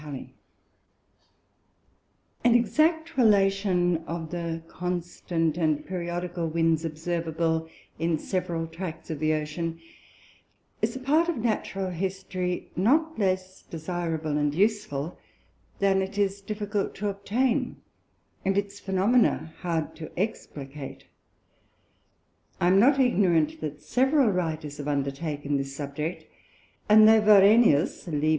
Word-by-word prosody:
Halley_._ 145 -3 -7 2.1
An 240 -1 +5
exact 315 +7 +2
Relation 195 -5 +3
of 165 -1 -5
the 165 -2 -4
constant 175 -2 -2
and 155 -3 0
periodical 175 -1 -3
Winds, 165 0 +1
observable 160 0 -2 0.3
in 165 0 +1
several 175 -1 -2
Tracts 165 0 -7
of 155 - -4
the 155 +1 +2
Ocean, 160 +2 -4 1.0
is - - 0
a - - -4
part 305 +6 +2
of 335 - -1
Natural 205 -4 -2
History 185 0 -3
not 305 - +2
less 185 -1 -1
desireable 160 -2 -3
and 145 0 0
useful, 190 -6 0 0.6
than 195 -1 +2
it 190 +1 -5
is 200 -1 0
difficult 205 0 -3
to 205 - -3
obtain, 210 +6 0 0.7
and 195 +1 +1
its 200 0 -2
Phænomena 195 -3 +2
hard 165 -3 -2
to 155 - -7
explicate: 145 - -5 1.6
I 175 - +3
am 190 +1 +5
not 270 +5 +5
ignorant 180 - +2
that 150 -1 -5
several 265 0 +3
Writers 160 -5 -3
have 145 0 -6
undertaken 145 +1 -2
this 135 0 -4
Subject, 150 +4 -4 0.6
and 215 +1 +8
although 220 0 +7
Varenius 205 -5 +5
(_Lib. 155 -1 0
175 Hz, 115 wpm, -26 LUFS, 160-205 Hz, 2.1 s, and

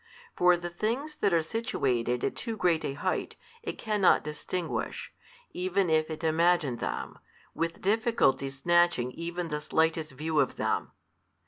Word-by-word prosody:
For 180 0 +5
the 175 0 -5
things 245 - -2
that 200 - +2
are 165 -2 +3
situated 125 - -1
at - - 0
too 230 -2 -4
great 175 -5 +2
a 135 - -2
height, 185 +6 -2 0.3
it - - -5
cannot 210 -4 +3
distinguish, 160 +3 -4 0.4
even 185 0 0
if 155 0 +2
it 160 +1 -6
imagine 160 -4 +2
them, - - -4 0.3
with 165 0 -3
difficulty 205 - +2
snatching 155 -2 +2
even 170 +3 -4
the 150 -1 -3
slightest 160 -1 0
view 155 +3 -1
of - - +1
them. - - -1
170 Hz, 145 wpm, -29 LUFS, 150-185 Hz, 0.4 s, For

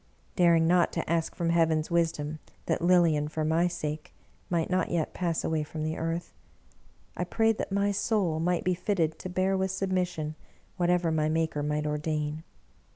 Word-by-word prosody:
Daring 170 -2 +4
not 175 +1 +3
to 165 - -2
ask 165 -1 0
from 170 -1 0
Heaven's 160 -1 +2
wisdom 160 -3 0 0.3
that - - 0
Lilian, 170 -4 +4
for 155 0 -2
my 165 +3 +2
sake, 155 -3 -5 0.3
might 170 -2 +1
not 185 -1 0
yet 165 -3 -1
pass 170 -3 -1
away 160 -1 0
from 155 +1 -5
the 155 +1 -2
earth, 165 +1 -3 0.8
I 180 - -1
prayed 225 +4 +1
that - - -3
my 200 +1 +2
soul 195 -5 0
might 175 +1 0
be 185 - +2
fitted 170 -4 -1
to 185 - -6
bear 185 +2 +1
with 190 0 0
submission 180 -5 -1 0.4
whatever 175 -2 +2
my 155 -1 +1
Maker 160 -2 0
might 150 +1 -1
ordain. 150 0 -2
165 Hz, 170 wpm, -28 LUFS, 155-180 Hz, 0.8 s, Daring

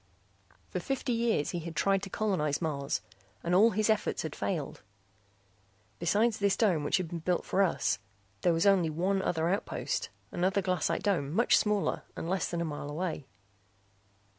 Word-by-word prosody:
For 180 - -2
fifty 255 +4 -2
years 230 -10 +1
he 175 - -2
had 165 0 -7
tried 195 +3 +2
to 195 - -6
colonize 175 -9 0
Mars 140 -4 -2 0.4
and 170 - 0
all 205 +5 +7
his 215 0 +1
efforts 215 -2 +1
had 160 - -5
failed. 160 -8 -3 1.2
Besides 210 +7 +2
this 200 -1 +2
dome 180 -9 +2
which 145 - +2
had 185 -3 -2
been 170 - -4
built 175 +2 0
for 195 - +1
us 175 - +1 0.4
there 175 - +3
was 165 +2 +1
only 190 -5 +4
one 185 +5 0
other 165 -3 0
outpost, 195 +4 -2 0.2
another 190 +2 +1
glassite 180 -4 0
dome 170 -9 +1
much 230 +9 +4
smaller 210 -2 +1
and - - -5
less 190 +2 0
than 170 -1 -2
a - - 0
mile 145 -2 -5
away. 155 -2 -3
180 Hz, 170 wpm, -30 LUFS, 160-200 Hz, 1.2 s, all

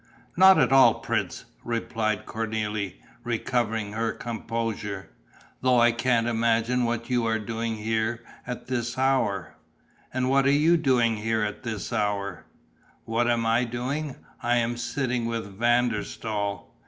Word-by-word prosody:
"Not 190 +1 +8
at 135 -4 +3
all, 135 0 +7
prince!" - - -3 0.2
replied 110 -2 -2
Cornélie, 110 -3 -3 0.3
recovering 115 -3 -1
her 115 +1 0
composure. 115 - -4 0.5
"Though 125 -1 +4
I 120 0 +6
can't 120 0 +1
imagine 115 +1 +1
what 120 +1 -2
you 120 -2 +2
are 110 0 +1
doing 115 +1 -3
here, 110 +2 -1 0.2
at 125 -1 -5
this 120 -2 -2
hour." 130 -8 +1 0.6
"And 130 0 0
what 135 +1 +3
are - - +5
you 155 +4 +4
doing 125 -8 +2
here, 110 +1 0
at 105 0 -3
this 115 -5 -4
hour?" 100 -1 -2 0.6
"What 115 +1 +1
am 120 -1 +1
I 115 +2 +3
doing? 130 +5 -3 0.3
I 120 -1 +2
am 120 0 +1
sitting 120 -1 -2
with 115 -4 -4
Van 120 +1 +3
der 105 -2 -2
Staal...." 100 -3 -4
115 Hz, 145 wpm, -26 LUFS, 110-125 Hz, 0.6 s, Not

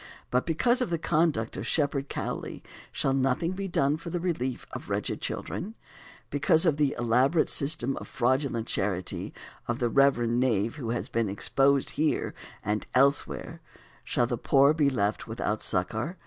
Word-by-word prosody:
But 125 +1 +1
because 240 - +2
of 250 - 0
the 170 - 0
conduct 155 -8 0
of 100 +5 -5
Shepherd 140 -2 0
Cowley - - -5 0.3
shall 135 - 0
nothing 135 +5 +1
be 195 +1 -4
done 145 -4 +1
for 165 +1 -8
the 175 - -2
relief 130 -8 -2
of - - -8
wretched - - -2
children? 210 +6 -4 0.6
Because 155 +4 +3
of 155 -4 +3
the 145 -2 +1
elaborate 125 +7 +2
system 140 -2 +2
of - - -7
fraudulent 130 -2 0
charity 95 -5 -2 0.4
of 120 - -1
the 120 -1 0
reverend 120 -3 +3
knave 115 -1 +1
who 120 -6 -5
has 120 - -2
been 115 -3 -1
exposed 135 +7 +1
here 155 - 0 0.3
and 105 +1 -1
elsewhere 140 +2 +1 0.4
shall - - +1
the - - -3
poor 140 +2 +4
be 150 -3 +2
left 105 -5 -1
without 110 -1 -2
succor? 110 - -1
135 Hz, 160 wpm, -28 LUFS, 120-155 Hz, 0.6 s, poor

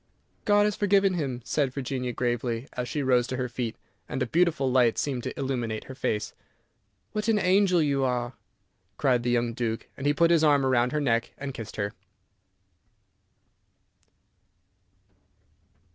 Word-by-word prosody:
"God 205 0 +5
has 210 -1 0
forgiven 200 -1 +3
him," 135 -8 -3
said 140 -4 0
Virginia, 130 -2 -3
gravely, 120 0 -2
as 125 -1 -4
she 150 - -2
rose 125 -2 +3
to 130 - -3
her 125 0 -1
feet, 120 -2 -4 0.3
and - - -1
a - - -1
beautiful 155 -3 +1
light 125 -3 +3
seemed 135 -4 -1
to - - -6
illumine 120 -5 -2
her 130 - -8
face. 110 -5 -2 0.8
"What 210 +1 -3
an 225 -2 +3
angel 185 -3 +3
you 140 -2 +1
are!" 125 -1 -1 0.6
cried 125 -3 +2
the 120 - -1
young 120 -1 +1
Duke, 115 -2 -3
and 140 - -3
he 145 - +4
put 170 +1 +4
his 165 -2 +4
arm 145 -3 +4
round 125 -1 +2
her 150 - 0
neck, 115 -4 0
and 135 -1 -5
kissed 115 -3 -8
her. 100 -1 -2
130 Hz, 160 wpm, -27 LUFS, 120-150 Hz, 0.8 s, God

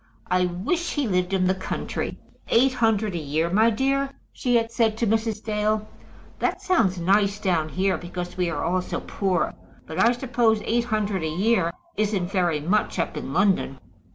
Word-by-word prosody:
I 180 0 +3
wish 210 - -2
he 290 -4 0
lived 180 -2 0
in 190 -1 +2
the 185 - +3
country. 190 0 -4 0.3
Eight 255 +3 +4
hundred 220 -4 +1
a 170 - -2
year, 155 +3 -1
my 220 +4 +5
dear?" 275 +4 +1 0.2
she 245 -1 0
had 230 -1 +2
said 225 -2 +1
to 235 - +1
Mrs. 220 0 0
Dale. 215 0 0 0.5
"That - - 0
sounds 225 - +2
nice 200 +3 +2
down 170 -6 0
here, 190 +3 0
because 175 0 -6
we 180 -2 0
are 170 - -3
all 180 +2 +1
so - - -4
poor. 190 -3 -1 0.3
But 160 - -6
I 230 - +5
suppose 240 -3 +1
eight 235 +1 +1
hundred 210 -4 -1
a 160 - -1
year 185 +1 +1 0.3
isn't 200 -4 0
very 175 -6 +1
much 190 +9 0
up 170 - -1
in - - -5
London?" 185 -6 +2
200 Hz, 180 wpm, -24 LUFS, 180-225 Hz, 0.5 s, my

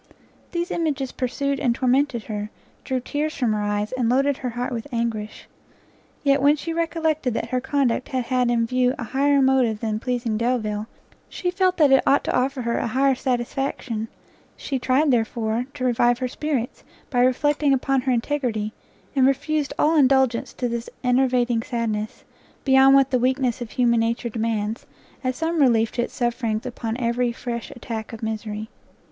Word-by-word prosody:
These 345 +1 -2
images 290 -6 -1
pursued 275 +2 -2
and 240 -4 +1
tormented 255 -2 +1
her, 210 -1 -4 0.3
drew 260 -1 -1
tears 300 +4 -2
from 245 -5 +1
her 210 - -1
eyes, 205 0 -1
and 250 -3 0
loaded 275 +2 +2
her 255 - -3
heart 245 +2 -3
with 230 -1 -5
anguish. 230 -3 -3 0.8
Yet, 280 -1 +3
when 290 +2 +5
she 325 +2 -4
recollected 320 -6 0
that 230 - -3
her 255 +1 0
conduct 265 -2 0
had 260 -2 -1
had 250 0 +1
in 235 -1 +2
view 250 +2 +1
an 235 - -4
higher 280 +3 +2
motive 255 -5 +2
than 215 -1 -2
pleasing 235 -3 -2
Delvile, 220 -3 -1 0.4
she 360 - -2
felt 370 0 +1
that 295 -5 +5
it 270 - +6
ought 280 - +4
to - - -1
offer 260 0 0
her 235 0 0
an - - -1
higher 265 +3 +2
satisfaction; 245 -2 -2 0.5
she 270 -2 -3
tried, 270 +4 +2
therefore, 230 0 0
to 255 - -3
revive 240 0 +3
her 255 0 -2
spirits, 260 -2 -3 0.3
by 250 - +1
reflecting 290 +3 +2
upon 270 0 +2
her 260 0 0
integrity, 235 -4 -1 0.4
and 265 -1 +5
refused 295 +2 0
all 310 +2 +3
indulgence 265 -4 +3
to 245 - -2
this 235 0 -4
enervating 250 -2 +2
sadness, 220 -3 -3 0.4
beyond 270 0 +6
what 275 -1 +4
the 255 - +3
weakness 255 -1 0
of 235 - -5
human 235 -1 +2
nature 230 +1 -1
demands, 220 -1 -2 0.4
as 255 0 -1
some 325 +2 0
relief 230 -4 +3
to 240 - -1
its - - -4
sufferings 235 -3 -1
upon 230 -2 -4
every 240 0 0
fresh 235 -1 -5
attack 225 -2 -6
of 225 -1 -9
misery. 215 -1 -4
250 Hz, 175 wpm, -23 LUFS, 230-270 Hz, 0.8 s, it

